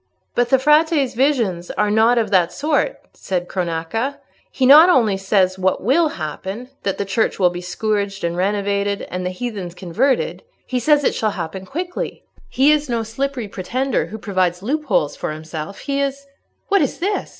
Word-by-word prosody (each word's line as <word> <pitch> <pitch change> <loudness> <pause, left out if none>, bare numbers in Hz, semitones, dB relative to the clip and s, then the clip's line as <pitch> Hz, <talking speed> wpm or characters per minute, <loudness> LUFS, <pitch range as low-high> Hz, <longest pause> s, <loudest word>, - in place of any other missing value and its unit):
'" - - -50
"But 245 0 +1
the 265 - +5
Frate's 300 -1 +3
visions 230 -10 0
are 210 0 0
not 225 +3 +4
of 220 -3 0
that 180 -3 +3
sort," 305 - 0 0.2
said 180 -2 -3
Cronaca. 180 +10 -2 0.3
"He 260 - 0
not 305 +7 +9
only 230 - +4
says 190 -1 +1
what 185 0 0
will 300 - +3
happen—that 195 - -5
the 200 - -2
Church 210 +3 0
will 180 -2 +3
be 175 0 -6
scourged 200 +2 -2
and 170 0 -1
renovated, 200 +1 0
and 180 0 -3
the 180 - -1
heathens 185 -3 -5
converted—he 255 - -2
says 295 +3 +3
it - - +2
shall 215 - 0
happen 185 +2 -5
quickly. 350 - -5 0.3
He 275 +3 +4
is 300 -2 +1
no 230 -1 0
slippery 245 +1 -3
pretender 245 +7 -2
who 220 - -7
provides 185 -4 -1
loopholes 245 - 0
for - - -4
himself, 155 +4 -7
he 280 -1 -1
is—" 280 0 -3 0.4
"What 400 -2 +4
is 280 - -1
this? 400 +4 -2
215 Hz, 170 wpm, -20 LUFS, 185-275 Hz, 0.4 s, not